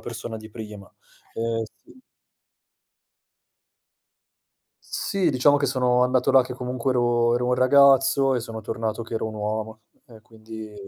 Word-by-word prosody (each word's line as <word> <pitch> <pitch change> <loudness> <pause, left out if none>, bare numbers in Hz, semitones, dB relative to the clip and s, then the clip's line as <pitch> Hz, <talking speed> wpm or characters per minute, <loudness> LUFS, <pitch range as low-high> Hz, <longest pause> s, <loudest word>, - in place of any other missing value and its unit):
persona 115 -1 -7
di 110 0 -11
prima, 105 -3 -10 0.4
ehm, 115 0 -2 0.2
sì 260 - -19 2.8
Sì, 190 -5 -1
diciamo 145 +2 +3
che 140 - 0
sono 125 -1 +1
andato 130 +1 +1
là 130 -1 +6
che 125 0 -8
comunque 125 0 -3
ero 120 -1 +2
ero 125 0 -2
un 125 - +2
ragazzo 135 +1 +4
e 125 - -1
sono 110 -1 -7
tornato 110 +1 -4
che 115 - -8
ero 110 0 -2
un 110 - -9
uomo, 110 +1 -4 0.2
e 110 -2 -16
quindi 110 -1 -11
120 Hz, 145 wpm, -23 LUFS, 110-130 Hz, 2.8 s, là